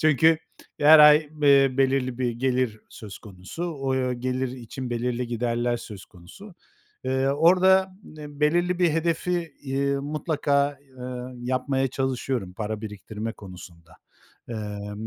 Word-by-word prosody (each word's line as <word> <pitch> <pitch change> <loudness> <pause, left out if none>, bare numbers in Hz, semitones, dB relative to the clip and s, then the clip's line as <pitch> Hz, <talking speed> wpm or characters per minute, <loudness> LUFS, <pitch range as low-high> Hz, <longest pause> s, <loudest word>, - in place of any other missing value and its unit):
Çünkü 155 +1 +4 0.4
her 150 +2 +8
ay, 150 0 +9 0.3
eee, 140 -2 +5
belirli 130 -2 +1
bir 125 -2 0
gelir 125 -2 -1
söz 105 -3 -10
konusu. 100 - -8
O 135 -5 -2
gelir 130 +1 -2
için 125 0 -7
belirli 120 +1 -2
giderler 120 0 -1
söz 105 -5 -10
konusu. 100 - -15 0.5
Eee, 130 +1 0
orada, 185 +5 +4 0.3
em 145 -1 -10
belirli 175 +4 +2
bir 175 -2 +3
hedefi, 165 +1 -1
iii, 140 0 -1
mutlaka, 145 -1 -1 0.2
eee, 125 - -7 0.4
yapmaya 130 +2 -1
çalışıyorum 130 -6 -3
para 105 +1 -4
biriktirme 105 +1 -6
konusunda. 85 -5 -13 0.5
Emm, 105 -1 -6
130 Hz, 125 wpm, -25 LUFS, 115-150 Hz, 0.5 s, ay